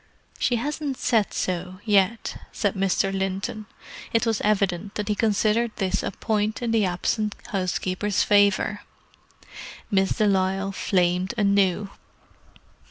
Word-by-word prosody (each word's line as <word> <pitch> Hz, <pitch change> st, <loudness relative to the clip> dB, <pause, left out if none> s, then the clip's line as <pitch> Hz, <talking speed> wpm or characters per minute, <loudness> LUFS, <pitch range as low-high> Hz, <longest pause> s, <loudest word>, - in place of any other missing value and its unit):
"She 245 Hz, -, +2 dB
hasn't 285 Hz, +2 st, -3 dB
said 225 Hz, -5 st, +1 dB
so, 180 Hz, 0 st, -3 dB
yet," 210 Hz, +1 st, +2 dB
said 205 Hz, -3 st, 0 dB
Mr. 195 Hz, 0 st, +1 dB
Linton. 195 Hz, +2 st, -3 dB, 0.5 s
It 230 Hz, +1 st, +2 dB
was 225 Hz, -2 st, 0 dB
evident 200 Hz, -2 st, 0 dB
that 210 Hz, 0 st, -3 dB
he -, -, +3 dB
considered 215 Hz, +2 st, +1 dB
this 190 Hz, -3 st, -1 dB
a -, -, -2 dB
point 215 Hz, +2 st, -1 dB
in 235 Hz, -, 0 dB
the 220 Hz, -3 st, +3 dB
absent 210 Hz, +4 st, -1 dB
housekeeper's 185 Hz, +1 st, -1 dB
favour. 205 Hz, 0 st, +3 dB, 1.1 s
Miss 195 Hz, -1 st, +2 dB
de 215 Hz, -, +3 dB
Lisle 195 Hz, 0 st, +1 dB
flamed 185 Hz, +1 st, 0 dB
anew. 200 Hz, -1 st, +2 dB
200 Hz, 125 wpm, -24 LUFS, 190-215 Hz, 1.1 s, he